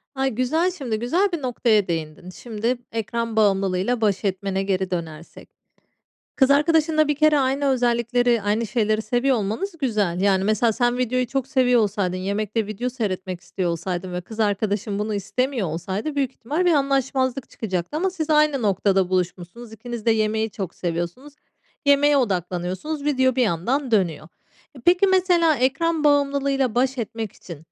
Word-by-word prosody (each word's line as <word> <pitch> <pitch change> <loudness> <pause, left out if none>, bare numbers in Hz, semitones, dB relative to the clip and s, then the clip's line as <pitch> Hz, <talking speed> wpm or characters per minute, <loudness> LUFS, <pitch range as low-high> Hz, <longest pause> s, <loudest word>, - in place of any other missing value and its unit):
Ay, 270 0 +1
güzel, 285 +10 0
şimdi 250 -11 -4
güzel 345 - +1
bir 335 - -2
noktaya 230 -6 +1
değindin. 160 +1 -4
Şimdi 230 +5 -3
ekran 230 +1 -3
bağımlılığıyla 195 +2 +1
baş 205 -1 +1
etmene 195 0 -1
geri 190 -1 -1
dönersek. 165 -2 -6 0.9
Kız 265 -1 +4
arkadaşınla 310 +1 +3
bir 295 - +2
kere 305 0 +4
aynı 270 +1 0
özellikleri, 240 -2 +1
aynı 215 +3 0
şeyleri 215 0 0
seviyor 245 +4 +1
olmanız 230 - -3
güzel. 210 - 0
Yani, 195 -1 +2
mesela 215 +2 +2
sen 245 +2 0
videoyu 255 0 0
çok 265 +1 -2
seviyor 255 -3 +3
olsaydın, 200 -3 -1
yemekte 205 +3 -2
video 215 +4 -3
seyretmek 190 -7 -4
istiyor 180 -1 -3
olsaydın 180 +2 -4
ve 180 - -3
kız 220 +5 -9
arkadaşın 205 0 0
bunu 210 +1 -2
istemiyor 230 - -1
olsaydı 190 - -4
büyük 275 -3 +1
ihtimal 300 +10 -2
bir 350 - +4
anlaşmazlık 270 -2 0
çıkacaktı 190 - -4
ama 375 +4 0
siz 320 -4 -4
aynı 300 -4 +3
noktada 195 -2 +2
buluşmuşsunuz. 185 +5 -3
İkiniz 230 0 -7
de - - +5
yemeği 220 0 +1
çok 190 -4 -6
seviyorsunuz. 175 - -4 0.5
Yemeğe 285 +1 +5
odaklanıyorsunuz. 190 - -2
Video 260 -3 +2
bir 255 - +3
yandan 240 - 0
dönüyor. 175 -8 0 0.5
E, 260 - -11
peki 360 +3 +5
mesela 355 -4 +3
ekran 300 +5 0
bağımlılığıyla 280 -3 +2
baş 260 +1 +1
etmek 225 -2 -4
için 170 -4 -11
230 Hz, 155 wpm, -23 LUFS, 195-270 Hz, 0.9 s, de